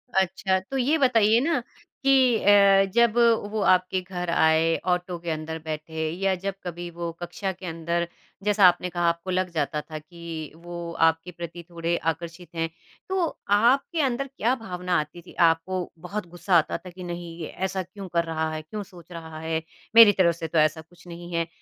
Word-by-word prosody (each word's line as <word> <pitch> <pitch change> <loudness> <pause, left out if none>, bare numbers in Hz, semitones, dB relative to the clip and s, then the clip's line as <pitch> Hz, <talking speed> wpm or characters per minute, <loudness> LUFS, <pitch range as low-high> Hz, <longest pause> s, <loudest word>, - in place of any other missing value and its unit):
अच्छा, 190 0 +1
तो 270 +9 -5
ये 275 +5 +2
बताइए 230 -5 +4
ना 300 -6 +2 0.4
कि 260 -4 +5
अ, 200 -1 +6
जब 235 -1 +4 0.3
वो 215 - -1
आपके 185 0 +3
घर 180 -1 -5
आए 160 0 +3
ऑटो 180 0 0
के 170 0 -6
अंदर 160 +1 -4
बैठे, 160 0 -4
या 190 +3 0
जब 195 +2 -4
कभी 175 -1 -5
वो 170 0 -4
कक्षा 185 +3 -3
के 185 0 -11
अंदर 170 +1 -2 0.4
जैसा 205 -2 +4
आपने 180 +1 +2
कहा 175 -1 -2
आपको 170 +2 -4
लग 185 0 0
जाता 150 -1 -1
था 155 0 -8
कि 165 -1 -8
वो 170 0 -7
आपके 165 +2 +2
प्रति 170 0 -8
थोड़े 170 0 -1
आकर्षित 170 +1 -4
हैं, 165 0 -1 0.4
तो 375 -2 +1 0.2
आपके 265 - +3
अंदर 275 0 0
क्या 255 -3 0
भावना 180 -7 -2
आती 155 +3 -6
थी? 180 - -15
आपको 170 +2 +1
बहुत 190 +2 -5
गुस्सा 175 +2 0
आता 160 - +1
था 185 - -11
कि 180 +1 -10
नहीं 175 -1 -6
ये 160 - -4 0.2
ऐसा 190 0 -3
क्यों 190 +1 -10
कर 170 0 +3
रहा 160 -1 -2
है? 155 - -4
क्यों 205 +7 -6
सोच 180 -3 -16
रहा 160 -2 -8
है? 160 0 -2 0.3
मेरी 230 -2 +10
तरफ 170 -3 +4
से 165 -1 -5
तो 160 +1 -2
ऐसा 155 +1 +2
कुछ 170 +3 -21
नहीं 175 0 -9
है 165 -1 0
175 Hz, 190 wpm, -25 LUFS, 165-195 Hz, 0.4 s, मेरी